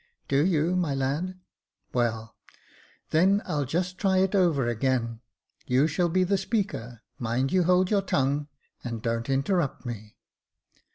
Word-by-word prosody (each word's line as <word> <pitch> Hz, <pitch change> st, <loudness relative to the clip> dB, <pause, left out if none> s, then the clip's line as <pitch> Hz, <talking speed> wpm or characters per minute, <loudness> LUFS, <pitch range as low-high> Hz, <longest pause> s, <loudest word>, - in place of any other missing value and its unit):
" -, -, -46 dB
Do 140 Hz, +1 st, +3 dB
you, 170 Hz, 0 st, +2 dB
my 165 Hz, -6 st, 0 dB
lad? 150 Hz, +8 st, -2 dB, 0.5 s
well, 115 Hz, -2 st, -1 dB, 0.8 s
then 190 Hz, +5 st, +4 dB
I'll 145 Hz, -2 st, -1 dB
just 180 Hz, +7 st, -2 dB
try 190 Hz, -2 st, +2 dB
it 190 Hz, +1 st, +2 dB
over 170 Hz, -10 st, +3 dB
again. 120 Hz, -1 st, 0 dB, 0.5 s
You 130 Hz, +3 st, +3 dB
shall 165 Hz, +3 st, +1 dB
be 185 Hz, +2 st, +2 dB
the 195 Hz, +1 st, +1 dB
Speaker 190 Hz, -, -3 dB
— -, -, -46 dB
mind 125 Hz, +4 st, -1 dB
you 185 Hz, -2 st, +3 dB
hold 180 Hz, +2 st, +3 dB
your 205 Hz, -2 st, +3 dB
tongue, 145 Hz, -6 st, 0 dB, 0.4 s
and 115 Hz, -3 st, -5 dB
don't 115 Hz, +1 st, -2 dB
interrupt 140 Hz, +3 st, 0 dB
me." 110 Hz, -3 st, -7 dB
150 Hz, 155 wpm, -27 LUFS, 125-185 Hz, 0.8 s, then